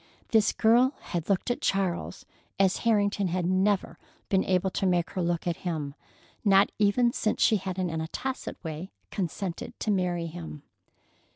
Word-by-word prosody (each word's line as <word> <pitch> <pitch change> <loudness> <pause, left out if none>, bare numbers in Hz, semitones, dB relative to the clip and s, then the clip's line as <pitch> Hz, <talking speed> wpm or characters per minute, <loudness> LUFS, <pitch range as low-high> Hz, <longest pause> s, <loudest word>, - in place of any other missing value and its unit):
This 220 -3 +4
girl 245 +5 +4
had 170 0 -4
looked 195 +4 +1
at 245 - -3
Charles 190 -3 -1 0.3
as 190 -1 +3
Harrington 205 -3 +2
had 180 0 -1
never 190 +2 +1 0.3
been 190 -1 +3
able 185 0 +1
to 195 - 0
make 175 -2 +1
her 185 - -2
look 170 -1 -1
at 170 -1 -1
him, 155 -6 -3 0.5
not 200 -1 +5
even 235 +4 +3
since 215 - 0
she 220 - +4
had 190 -1 -5
in 180 -2 -1
a 160 0 -3
tacit 265 +9 -4
way 160 +3 -5 0.2
consented 185 -1 -4
to 215 - 0
marry 180 -3 0
him. 80 - -8
190 Hz, 165 wpm, -28 LUFS, 175-205 Hz, 0.5 s, not